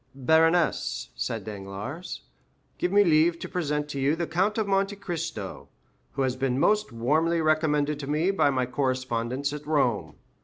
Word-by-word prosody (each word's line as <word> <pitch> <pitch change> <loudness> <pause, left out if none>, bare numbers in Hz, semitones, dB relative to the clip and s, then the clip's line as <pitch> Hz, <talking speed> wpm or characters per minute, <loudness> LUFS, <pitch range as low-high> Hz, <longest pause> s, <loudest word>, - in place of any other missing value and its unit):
"Baroness," 160 - +2
said 60 - -3
Danglars, 105 - -6 0.6
"give 180 - 0
me 205 +1 +6
leave 165 -1 +4
to - - -6
present 150 -5 -2
to 140 - -4
you 140 +3 +2
the 170 +1 -2
Count 190 +7 0
of 220 - +1
Monte 195 +1 +1
Cristo, 165 - -5 0.4
who 135 - 0
has 130 -1 0
been 130 -1 -1
most 210 +1 +2
warmly 155 +9 +1
recommended 150 -2 +1
to 140 - -6
me 160 +6 +2
by 190 -7 +3
my 130 -2 +1
correspondents 130 +1 -1
at 150 0 -6
Rome. 120 - 0
150 Hz, 160 wpm, -26 LUFS, 130-170 Hz, 0.6 s, me